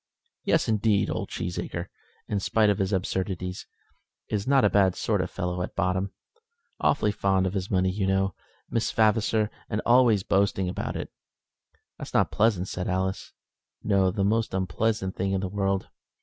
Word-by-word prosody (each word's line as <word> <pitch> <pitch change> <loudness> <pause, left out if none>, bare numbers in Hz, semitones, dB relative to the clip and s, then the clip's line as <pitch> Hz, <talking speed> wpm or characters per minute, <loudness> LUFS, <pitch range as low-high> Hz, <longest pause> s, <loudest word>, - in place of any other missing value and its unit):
"Yes, 165 -8 +2
indeed. 105 -2 +2
Old - - -3
Cheesacre, 90 0 -4 0.4
in 100 - -1
spite 105 +2 +3
of 100 - -2
his 95 0 0
absurdities, 95 -1 -2 0.6
is 105 +1 -2
not 135 -4 +4
a - - +5
bad 95 -3 +3
sort - - 0
of - - -3
fellow 90 0 -3
at 90 - -5
bottom; 95 +2 0 0.7
awfully 105 -7 +2
fond 95 -2 +1
of 95 - -1
his 95 -1 -3
money, 95 -1 +2
you 95 0 -1
know, 95 -1 +1 0.3
Miss 115 - -1
Vavasor, 110 -1 +2 0.2
and 105 - -1
always 120 -5 +5
boasting 95 -1 +1
about 90 - -3
it." - - -5 0.9
"That's - - -7
not - - +3
pleasant," 105 -4 +2
said 90 -1 -4
Alice. 95 +1 -2 0.5
"No, 100 -2 +3
the 95 +2 -1
most 110 0 +1
unpleasant 95 +2 -1
thing 95 +1 -1
in 95 - 0
the 95 - -2
world. 95 0 -1
95 Hz, 165 wpm, -26 LUFS, 95-105 Hz, 0.9 s, a